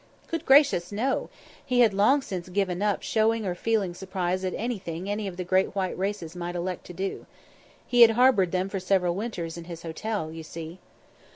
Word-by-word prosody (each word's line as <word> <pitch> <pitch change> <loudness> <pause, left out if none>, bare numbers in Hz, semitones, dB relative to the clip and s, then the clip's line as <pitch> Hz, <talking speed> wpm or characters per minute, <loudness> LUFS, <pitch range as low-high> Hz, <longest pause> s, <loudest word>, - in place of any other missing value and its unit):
Good 330 0 -4
gracious! 270 - +5
no. 235 +7 -1 0.3
He 250 -2 +2
had 225 -4 +5
long 240 +8 +4
since 185 -5 -5
given 185 -1 -1
up 205 -1 0
showing 225 -2 +1
or 180 - -1
feeling 200 -1 0
surprise 185 0 -2
at 185 - -2
anything 190 -6 -4
any 205 0 -2
of 180 -2 -7
the 185 - -2
great 185 +2 +1
white 190 -2 -1
races 185 -3 -3
might 175 0 -4
elect 180 0 -4
to 180 - -8
do. 190 +2 -4 0.6
He 245 -1 +3
had 230 - +11
harboured 240 -9 +4
them 185 0 0
for 195 0 -3
several 185 -2 +1
winters 175 -5 -4
in 165 - -9
his 170 -1 -8
hotel, 165 +1 -3
you 165 0 -7
see. 165 +2 -8
190 Hz, 195 wpm, -26 LUFS, 175-215 Hz, 0.6 s, had